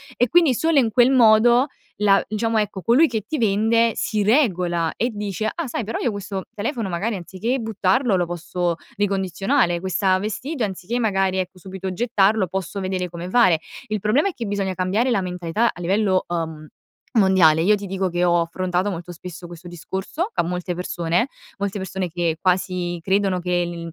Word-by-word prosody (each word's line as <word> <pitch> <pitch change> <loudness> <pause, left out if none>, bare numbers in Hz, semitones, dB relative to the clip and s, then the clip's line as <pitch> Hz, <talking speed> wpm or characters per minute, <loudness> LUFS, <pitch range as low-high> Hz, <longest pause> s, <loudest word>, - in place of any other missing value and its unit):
e 245 - +2
quindi 335 -6 +5
solo 320 +5 +1
in 235 -5 +3
quel 245 +3 +5
modo, 240 0 +5 0.3
la 200 -1 +4
diciamo 225 +1 -1
ecco 205 -3 -1
colui 250 - +4
che, 225 -5 -2
ti 310 - -3
vende 225 +2 +2
si 215 - -1
regola 180 - +2
e 240 - 0
dice: 210 0 -3
"Ah, 335 -5 -3
sai 235 -2 -3
però 225 - -3
io 240 - 0
questo 195 -1 -5
telefono 225 0 -3
magari 200 +6 -2
anziché 190 +7 -3
buttarlo, 220 0 +1
lo 175 - +1
posso 175 0 -2 0.2
ricondizionare, 195 0 +1
questa 185 +1 +1
vestito 235 +6 -3
anziché 200 +5 -4
magari, 195 -4 +1
ecco, 185 0 -3
subito 190 0 -6
gettarlo, 215 -2 +2
posso 190 +2 -4
vedere 185 -1 -2
come 175 +1 -7
fare." 185 -8 +4 0.3
Il 215 -1 -2
problema 225 - +2
è 390 - -2
che 240 - -6
bisogna 200 -2 -2
cambiare 190 +7 0
la 235 -5 +2
mentalità 180 +5 -1
a - - -13
livello, 190 +1 +1
uhm, 160 -3 -4 0.5
mondiale. 180 -6 +5
Io 210 +5 +4
ti 205 0 -6
dico 190 0 -2
che 175 +1 0
ho 175 -1 +3
affrontato 180 +3 -1
molto 175 -1 -6
spesso 175 0 -9
questo 175 +1 -11
discorso, 190 - -4
ca - - +1
molte 180 +1 -3
persone, 175 +6 -1 0.3
molte 200 0 -2
persone 190 -1 -4
che 170 -1 -1
quasi 180 -2 0
credono 190 0 +1
che 175 0 0
l 175 - -5
il 170 - -7
190 Hz, 185 wpm, -22 LUFS, 180-220 Hz, 0.5 s, quindi